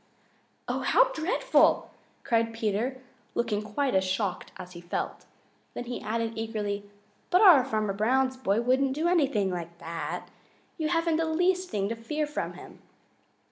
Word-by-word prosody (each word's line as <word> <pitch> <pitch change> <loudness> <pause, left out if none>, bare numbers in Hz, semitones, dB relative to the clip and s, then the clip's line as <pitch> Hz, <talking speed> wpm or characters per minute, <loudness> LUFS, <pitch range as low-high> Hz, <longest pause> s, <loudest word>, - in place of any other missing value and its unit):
"Oh, - - -1
how - - +4
dreadful!" 390 +6 +2 0.3
cried 230 -1 +1
Peter, 225 +4 -1 0.4
looking 230 -3 0
quite 235 +6 -1
as 190 0 +3
shocked 190 0 -2
as 180 - -9
he 175 -1 -10
felt. 175 - -4 0.5
Then - - -3
he 245 0 -5
added 230 +1 -2
eagerly, 210 -2 -3 0.4
"But 360 - +4
our 350 -11 +8
Farmer 215 -5 -1
Brown's 255 +6 +1
boy 230 -4 0
wouldn't 260 +2 +2
do 315 +4 0
anything 275 - +2
like 170 -1 -6
that. 165 0 -5 0.5
You 310 - 0
haven't 330 -1 +1
the 325 - +1
least 360 +3 +1
thing 200 -2 -1
to 230 - -2
fear 300 +7 -2
from 295 - -4
him." - - -12
230 Hz, 155 wpm, -28 LUFS, 205-300 Hz, 0.5 s, our